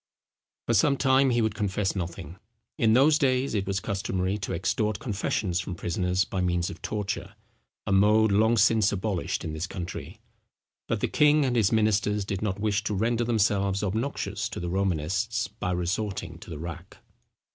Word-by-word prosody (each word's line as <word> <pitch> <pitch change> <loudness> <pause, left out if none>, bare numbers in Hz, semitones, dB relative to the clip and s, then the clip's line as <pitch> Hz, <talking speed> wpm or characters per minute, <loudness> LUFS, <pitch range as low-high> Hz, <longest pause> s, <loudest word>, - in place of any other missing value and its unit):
For - - +1
some 140 -2 +3
time 135 0 +4
he 120 -2 +2
would 110 -2 0
confess 105 -1 -1
nothing. 85 -1 -6 0.4
In 110 -1 +3
those 145 +5 +5
days 130 -2 +1
it 100 -3 -1
was 100 -1 0
customary 95 -1 -2
to 100 - -4
extort 100 +4 0
confessions 100 -4 -1
from 90 0 -4
prisoners, 90 +2 0
by 95 - -3
means 90 -1 0
of - - -11
torture, 100 -2 -4 0.5
a 100 - -2
mode 105 +2 +4
long 110 +3 +3
since 110 0 +4
abolished 100 -2 -2
in 80 - -4
this 80 +4 -3
country; 90 -3 -7 0.7
but - - -1
the - - +1
king 150 -1 +4
and 125 -2 0
his 110 -5 +3
ministers 105 -2 +1
did 95 -1 -3
not 100 -2 -2
wish 105 0 0
to 105 - -1
render 115 +4 +1
themselve 100 -3 +1
obnoxious 110 +8 -2
to - - -6
the 85 - -4
Romanists 95 +4 -1
by 105 -3 -5
resorting 90 -1 -3
to - - -12
the 80 - -6
rack. 85 +1 -8
100 Hz, 175 wpm, -27 LUFS, 95-110 Hz, 0.7 s, those